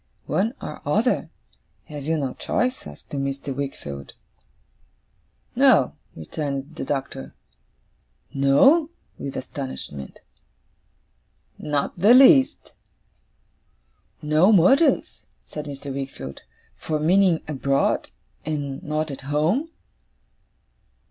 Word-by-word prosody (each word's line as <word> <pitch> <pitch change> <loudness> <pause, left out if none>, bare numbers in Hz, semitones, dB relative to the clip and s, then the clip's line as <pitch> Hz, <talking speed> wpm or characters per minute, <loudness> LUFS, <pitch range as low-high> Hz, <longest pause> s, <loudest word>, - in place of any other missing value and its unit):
'One 225 +7 0
or 150 - -7
other? 215 - +1 0.6
Have 145 -3 -8
you 160 +1 0
no 135 -4 -2
choice?' 250 - -2
asked 75 0 -14
Mr. 140 -1 -3
Wickfield. 75 - -6 1.4
'No,' - - +5 0.2
returned 140 - -5
the - - -5
Doctor. 135 - -4 1.0
'No?' 265 - +4 0.3
with 140 -1 -5
astonishment. 130 - -7 1.4
'Not 145 +3 -2
the 215 +7 +7
least.' 270 +1 +5 1.5
'No 155 +7 +4
motive,' 245 - +4 0.2
said 150 -1 -7
Mr. 140 -1 -7
Wickfield, 130 - -6 0.4
'for 155 -1 -2
meaning 180 +1 +3
abroad, 140 -2 0 0.3
and 145 -3 -4
not 155 0 -2
at 140 - -7
home? 155 - 0
150 Hz, 90 wpm, -23 LUFS, 135-180 Hz, 1.5 s, the